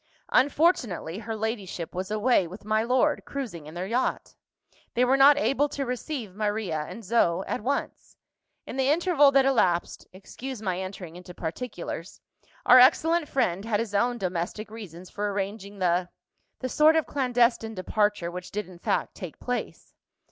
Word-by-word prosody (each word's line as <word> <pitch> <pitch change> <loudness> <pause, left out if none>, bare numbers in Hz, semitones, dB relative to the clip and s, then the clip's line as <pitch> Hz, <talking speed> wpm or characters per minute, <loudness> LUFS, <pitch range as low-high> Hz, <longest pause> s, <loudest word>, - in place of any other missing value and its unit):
Unfortunately, 255 - +2
her 225 0 -5
ladyship 210 -6 -4
was 185 +2 -4
away 215 -3 +2
with 190 +5 -11
my 215 0 +2
lord, 255 +6 +2
cruising 215 - -6
in 155 - -10
their 180 +2 -3
yacht. 235 +6 -1 0.6
They 245 +1 +4
were 260 +2 +4
not 280 +1 +7
able 290 0 +2
to 280 -1 -3
receive 250 - -4
Maria 205 -7 -2
and 230 - -9
Zoe 185 -4 +2
at - - -3
once. 275 +6 -3 0.5
In - - -7
the 265 0 +2
interval 310 -2 +4
that 270 -1 +5
elapsed 185 -10 +1
excuse 240 +7 -8
my 185 -4 -2
entering 185 -3 -7
into 180 0 -11
particulars 170 -1 -6 0.5
our 255 - +9
excellent 320 +5 +4
friend 195 -8 0
had 215 -2 0
his 225 -2 -3
own 240 +4 +1
domestic 185 +2 -3
reasons 185 -5 -10
for 205 0 -2
arranging 200 +1 -4
the 180 -1 +1 0.5
the 255 - -2
sort 310 +4 +5
of 320 - +2
clandestine 245 -4 +1
departure 205 -2 0
which 180 +1 -7
did 210 -2 -4
in 180 -2 -13
fact - - -1
take 180 -5 -9
place. 245 -1 -5
215 Hz, 160 wpm, -26 LUFS, 185-255 Hz, 0.6 s, our